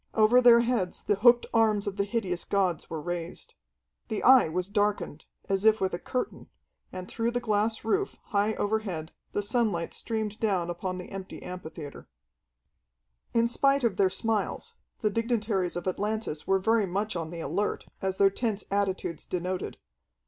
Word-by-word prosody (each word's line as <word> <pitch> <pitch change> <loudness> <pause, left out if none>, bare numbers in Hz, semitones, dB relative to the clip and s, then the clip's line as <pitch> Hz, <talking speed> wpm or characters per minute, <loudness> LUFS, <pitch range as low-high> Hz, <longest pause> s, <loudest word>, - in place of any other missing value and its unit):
Over 220 +3 +6
their 235 -1 +8
heads 235 -7 -1
the 205 - +1
hooked 240 +3 +6
arms 220 -3 +3
of 200 - -3
the 200 0 0
hideous 195 -5 -2
gods 185 -5 0
were 160 - -4
raised. 175 +1 -5 0.5
The 220 -3 -3
Eye 255 -8 +7
was 180 +3 -2
darkened, 205 -6 -1 0.2
as 195 0 0
if 220 0 +5
with 190 -1 0
a 175 - -2
curtain, 255 - -4 0.4
and 185 0 -7
through 230 0 -1
the 245 +1 -1
glass 220 0 0
roof, 390 - 0
high 210 +1 +1
overhead, 200 -7 -2 0.2
the 205 - 0
sunlight 205 -6 0
streamed 220 -1 -3
down 185 -6 0
upon 185 +1 -4
the 180 - -8
empty 195 -1 -7
amphitheatre. 160 -5 -8 1.3
In 230 0 +4
spite 275 +3 +2
of 220 -5 +1
their 190 -1 +4
smiles, 215 +3 -1 0.3
the 215 - +1
dignitaries 215 -5 0
of 175 +1 -4
Atlantis 205 -4 -2
were 195 - +4
very 220 +1 +2
much 200 +4 -2
on 165 -2 -3
the 170 0 -6
alert, 180 +8 -2 0.2
as 190 0 -1
their 195 -1 +5
tense 215 -1 -2
attitudes 190 -5 -1
denoted. 180 +1 -3
205 Hz, 165 wpm, -28 LUFS, 185-225 Hz, 1.3 s, their